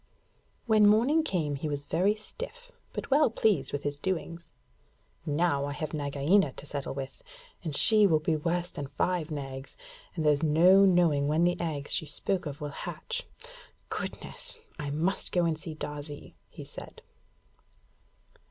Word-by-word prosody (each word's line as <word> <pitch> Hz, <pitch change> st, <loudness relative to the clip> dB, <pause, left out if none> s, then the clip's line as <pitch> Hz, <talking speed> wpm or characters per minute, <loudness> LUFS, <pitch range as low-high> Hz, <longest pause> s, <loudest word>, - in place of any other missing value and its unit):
When 215 Hz, -3 st, +5 dB
morning 240 Hz, +10 st, +4 dB
came 160 Hz, -, -1 dB
he 150 Hz, +2 st, -3 dB
was 145 Hz, -1 st, -2 dB
very 185 Hz, +8 st, +2 dB
stiff, -, -, -9 dB, 0.2 s
but -, -, -6 dB
well 290 Hz, 0 st, +5 dB
pleased 210 Hz, -9 st, +1 dB
with 145 Hz, -, -3 dB
his 145 Hz, 0 st, -3 dB
doings. 170 Hz, -2 st, -3 dB, 0.8 s
'Now 145 Hz, -2 st, +1 dB
I 145 Hz, -, -3 dB
have 155 Hz, +2 st, -4 dB
Nagaina 145 Hz, +3 st, +2 dB
to -, -, -8 dB
settle 140 Hz, -2 st, -4 dB
with, 135 Hz, -1 st, -6 dB, 0.4 s
and 155 Hz, -4 st, -3 dB
she 215 Hz, -2 st, +6 dB
will 160 Hz, -4 st, +3 dB
be 160 Hz, +1 st, 0 dB
worse 170 Hz, +3 st, -1 dB
than 145 Hz, -, -5 dB
five 175 Hz, +2 st, -1 dB
Nags, 135 Hz, -3 st, -6 dB, 0.4 s
and 160 Hz, -3 st, -2 dB
there's 150 Hz, -1 st, +4 dB
no 175 Hz, +5 st, +6 dB
knowing 170 Hz, -6 st, +3 dB
when 155 Hz, +3 st, +2 dB
the 175 Hz, 0 st, +3 dB
eggs 150 Hz, -4 st, -3 dB
she 160 Hz, -5 st, -1 dB
spoke 180 Hz, +4 st, -1 dB
of 145 Hz, 0 st, -6 dB
will 145 Hz, -, -3 dB
hatch. 465 Hz, -, -5 dB, 0.6 s
Goodness! -, -, -7 dB, 0.2 s
I 145 Hz, -1 st, -3 dB
must 165 Hz, +7 st, -1 dB
go 175 Hz, -1 st, +2 dB
and 165 Hz, -1 st, +1 dB
see 155 Hz, 0 st, -8 dB
Darzee,' 145 Hz, -1 st, -7 dB, 0.2 s
he -, -, -10 dB
said. -, -, -10 dB
160 Hz, 160 wpm, -29 LUFS, 145-190 Hz, 0.8 s, she